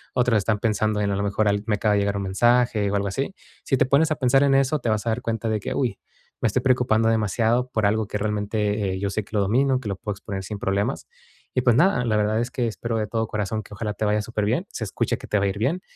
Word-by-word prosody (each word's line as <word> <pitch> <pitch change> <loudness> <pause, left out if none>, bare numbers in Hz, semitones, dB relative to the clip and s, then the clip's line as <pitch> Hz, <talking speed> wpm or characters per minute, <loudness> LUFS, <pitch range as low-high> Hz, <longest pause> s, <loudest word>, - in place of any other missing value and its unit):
otros 125 -3 +3
están 105 +1 0
pensando 110 -1 0
en 100 -1 0
a - - 0
lo 100 - -1
mejor 105 +1 0 0.2
me 105 - +2
acaba 105 +1 +1
de - - +2
llegar 100 0 0
un 100 - -2
mensaje, 115 +1 +2
o. 100 - 0
algo 100 0 0
así, 135 - -3 0.3
si 135 - +2
te - - +3
pones 145 +4 +3
a - - +2
pensar 135 0 +3
en 135 -1 +4
eso, 135 +3 +2
te 120 - -4
vas 110 +1 0
a - - +2
dar 120 +3 -2
cuenta 115 -1 -2
de 110 -1 0
que: - - -3
"Uy 120 -7 -1 0.4
me - - +3
estoy 125 +4 0
preocupando 120 -4 +2
demasiado 115 +3 +1
por 110 -4 0
algo 110 0 +1
que 105 - -3
realmente 105 -1 -1
yo 100 0 -1
sé 110 0 -2
que 105 - -9
lo 105 - +3
domino, 130 +6 +2
que 110 - -5
lo 100 - -3
puedo 105 - -4
exponer 95 -1 -6
sin 105 +1 -5
problemas". 100 +6 -1 0.5
Y 125 - +3
pues 120 -2 +4
nada, 145 -4 +3
la 110 - +1
verdad 105 +1 +1
es 120 +1 -3
que 125 -2 -1
espero 115 +1 -3
de 105 - -2
todo 110 0 -1
corazón, 105 +1 -3
que 105 - -14
ojalá 105 0 -3
te 110 - -2
vaya 105 0 +2
súper 105 -1 -2
bien, 125 - 0
se 110 - -5
escucha - - -1
que - - -11
te 105 - +1
va 100 - +1
a - - +2
ir 100 - -4
bien, 165 +11 0
110 Hz, 280 wpm, -24 LUFS, 105-125 Hz, 0.5 s, en